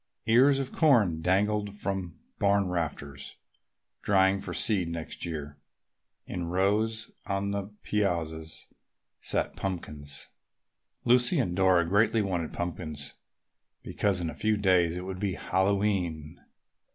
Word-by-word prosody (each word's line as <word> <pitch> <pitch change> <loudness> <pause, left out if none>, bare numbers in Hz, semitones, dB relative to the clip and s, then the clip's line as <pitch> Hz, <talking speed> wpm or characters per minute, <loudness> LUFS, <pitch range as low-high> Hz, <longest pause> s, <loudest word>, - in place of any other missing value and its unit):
Ears 130 +5 +5
of 135 -1 -3
corn 110 - +3
dangled 105 +3 +1
from 95 -5 -3 0.2
barn 100 -1 +3
rafters, 75 -5 -4 0.7
drying 95 -1 +3
for - - -5
seed 95 -6 +2
next 85 0 -5
year. 75 -3 -6 0.7
In 85 -2 -4
rows 105 +5 0 0.2
on 100 +1 -1
the 100 -1 -2 0.2
piazzas 80 -6 -2 0.5
sat - - -1
pumpkins. 75 -6 -5 0.8
Lucy 125 +7 +4
and 90 -10 0
Dora 95 -3 +4
greatly 110 +4 +3
wanted 90 -5 -2
pumpkins 80 -4 -4 0.7
because 100 -3 0
in 85 -2 -2
a - - -9
few 110 0 +1
days 90 -4 +3
it 90 - -5
would 95 -1 -5
be 100 -3 -1
Hallowe'en. 95 -5 -1
95 Hz, 120 wpm, -28 LUFS, 85-105 Hz, 0.8 s, Ears